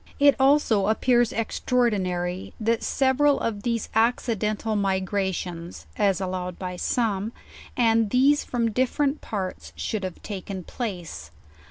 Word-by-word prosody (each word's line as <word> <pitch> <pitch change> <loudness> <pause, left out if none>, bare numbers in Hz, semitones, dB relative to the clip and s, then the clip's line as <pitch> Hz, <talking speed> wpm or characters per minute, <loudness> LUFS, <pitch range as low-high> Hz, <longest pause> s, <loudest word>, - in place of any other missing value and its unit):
It 285 -1 +6
also 265 -7 +4
appears 240 +2 +3
extraordinary, 190 -7 -1
that 230 +1 +1
several 275 +2 +2
of 210 -3 -2
these 230 0 -1
acci 230 +1 +2
dental 215 +1 -1
migrations, 190 -3 -2
as 195 -3 +2
allowed 185 -2 -3
by 180 -1 -5
some, 215 +1 -1 0.4
and 225 -3 +3
these 275 +5 +4
from 235 -2 -1
differ 255 +5 +1
ent 280 +1 0
parts, 190 -4 -5
should 215 -3 -3
have 185 -2 -5
taken 195 -2 -6
place. 175 - -6
215 Hz, 130 wpm, -25 LUFS, 190-240 Hz, 0.4 s, It